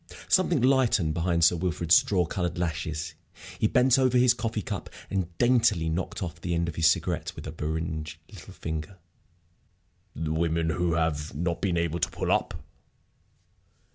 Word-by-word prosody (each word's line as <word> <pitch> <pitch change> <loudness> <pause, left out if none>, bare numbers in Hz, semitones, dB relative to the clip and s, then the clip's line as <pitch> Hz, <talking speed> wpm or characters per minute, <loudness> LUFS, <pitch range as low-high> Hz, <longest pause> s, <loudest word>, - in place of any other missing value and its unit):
Something 175 -8 +3
lightened 125 - +3
behind 85 0 0
Sir 85 +2 +5
Wilfrid's 85 -1 +2
straw 90 -4 +3
colored 90 +1 -3
lashes. 80 -2 -3 0.5
He - - +3
bent 130 +1 +4
over 130 -1 +3
his 125 -1 +5
coffee 115 -3 -3
cup - - -5 0.2
and 90 -3 -3
daintily 120 -9 +3
knocked 85 +3 -3
off 85 -1 -6
the 85 -1 -2
end 85 0 0
of 85 - -3
his 80 -1 +3
cigarette - - 0
with - - -9
a - - -5
beringed 80 0 -4
little - - -12
finger. 80 +4 -5 1.2
"The 80 0 -2
women 80 0 0
who 85 +1 0
have 80 -2 -1
not 85 +2 -2
been 90 -3 0
able 85 0 -1
to - - 0
pull - - -3
up?" - - +1
85 Hz, 165 wpm, -27 LUFS, 80-100 Hz, 1.2 s, Sir